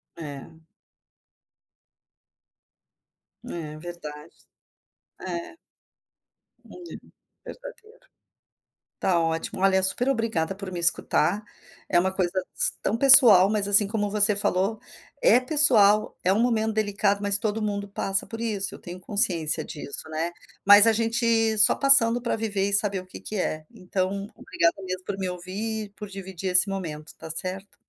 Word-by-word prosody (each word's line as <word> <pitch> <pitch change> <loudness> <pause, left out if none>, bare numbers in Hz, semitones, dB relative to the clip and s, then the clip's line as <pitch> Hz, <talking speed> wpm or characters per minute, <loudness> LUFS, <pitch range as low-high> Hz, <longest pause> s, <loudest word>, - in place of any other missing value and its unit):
É. 155 +1 -10 2.8
É 155 -3 -7
verdade, 155 -2 -10 0.9
é. 175 - -7 1.1
Olha 360 - -14
aí, - - -9 0.5
verdadeiro. - - -13 0.9
Está 175 -3 0
ótimo, 165 +2 -3
olha, 190 -1 +2
super 240 +7 0
obrigada 225 -9 -1
por 195 -1 -9
me 175 - -5
escutar, 175 +3 0 0.5
é 175 - +3
uma 190 +1 0
coisa 185 0 -2
s - - +4
tão 225 - -1
pessoal, 235 -8 +7
mas 205 -2 -1
assim 205 0 +4
como 205 0 -2
você 210 0 +3
falou, 200 +2 -1 0.4
é - - +5
pessoal, 235 -8 +3
é 185 - +3
um 215 - +1
momento 220 -2 0
delicado 205 -1 0
mas 200 -1 +2
todo 215 +1 -3
mundo 205 -1 -3
passa 195 0 -2
por 225 0 -9
isso, 210 -4 -2
eu - - -11
tenho 175 +1 -10
consciência 175 -6 0
disso, 145 +1 -8
né, 160 +2 -3 0.3
mas 205 +2 +8
a 225 - +5
gente 225 -1 0
só 210 - +6
passando 245 -4 +4
para 235 - -2
viver 205 -3 -2
e - - -6
saber 200 -1 +2
o 185 - -14
que - - -11
que 215 - -7
é. 155 -5 -3
Então, 195 -1 -4
obrigada 170 +3 -1
mesmo 185 0 -6
por 195 -1 -5
me 190 - -3
ouvir, 200 +4 -6
por 210 - -8
dividir 190 -1 -6
esse 180 +3 +5
momento, 155 -5 -7
tá - - -10
certo? 185 +4 -5
200 Hz, 145 wpm, -24 LUFS, 180-220 Hz, 2.8 s, mas